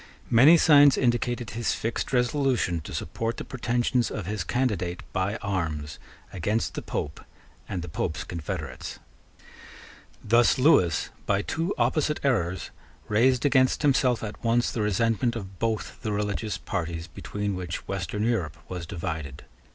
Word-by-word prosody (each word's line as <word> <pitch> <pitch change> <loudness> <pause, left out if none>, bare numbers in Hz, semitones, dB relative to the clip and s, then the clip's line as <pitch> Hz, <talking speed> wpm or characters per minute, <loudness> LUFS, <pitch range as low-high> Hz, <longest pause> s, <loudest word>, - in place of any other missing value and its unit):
Many 140 +9 +8
signs 145 -4 +7
indicated 120 -2 0
his 115 0 -1
fixed 115 +1 -3
resolution 125 - +1
to - - -7
support 115 +8 -3
the - - -4
pretensions 125 -1 0
of 105 - -5
his 105 -1 -2
candidate 90 -5 -1
by 95 +3 0
arms 80 -7 -3 0.3
against 105 +5 -1
the - - -4
Pope 75 - -4 0.5
and 90 -3 -3
the - - -6
Pope's 75 - -3
confederates. 85 -3 -5 1.3
Thus 115 +2 +4
Lewis, 125 - +4 0.2
by 100 0 +2
two 165 - -2
opposite 145 +5 +1
errors, 95 -10 0 0.4
raised 125 +4 +3
against 130 0 +3
himself 130 -5 +3
at 105 -1 -7
once 120 +1 +2
the 115 - -2
resentment 115 +3 +1
of 95 -4 -7
both 110 -2 -2
the 110 - -2
religious 105 -1 -2
parties 85 -2 -4
between 105 +2 -4
which 90 -2 -5
Western 100 +1 -2
Europe 95 -10 0
was 90 -3 -6
divided. 80 -6 -5
110 Hz, 140 wpm, -26 LUFS, 90-125 Hz, 1.3 s, Many